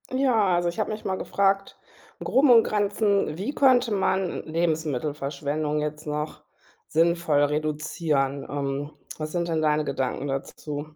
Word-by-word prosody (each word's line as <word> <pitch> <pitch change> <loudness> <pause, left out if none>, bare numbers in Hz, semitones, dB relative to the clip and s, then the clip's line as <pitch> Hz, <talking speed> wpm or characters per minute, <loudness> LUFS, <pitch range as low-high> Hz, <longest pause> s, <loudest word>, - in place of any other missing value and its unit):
Ja, 225 -9 +3
also 175 0 +1
ich 170 - -6
habe - - -1
mich 215 - -7
mal 190 -1 -2
gefragt, 195 0 0 0.4
im - - -6
Groben 270 +2 +4
und 230 -2 +8
Granzen, 205 -5 +1
wie 210 +10 -3
könnte 255 -5 +4
man 190 -2 0
Lebensmittelverschwendung 150 -2 -1
jetzt 150 +1 -5
noch 150 +1 -4 0.4
sinnvoll 165 -2 +2
reduzieren? 150 -1 -1
Ähm, 140 0 -3 0.3
was 155 0 -5
sind 170 -1 -1
denn 160 -1 0
deine 155 0 +2
Gedanken 135 0 -2
dazu? 145 +2 -5
155 Hz, 140 wpm, -25 LUFS, 150-195 Hz, 0.4 s, und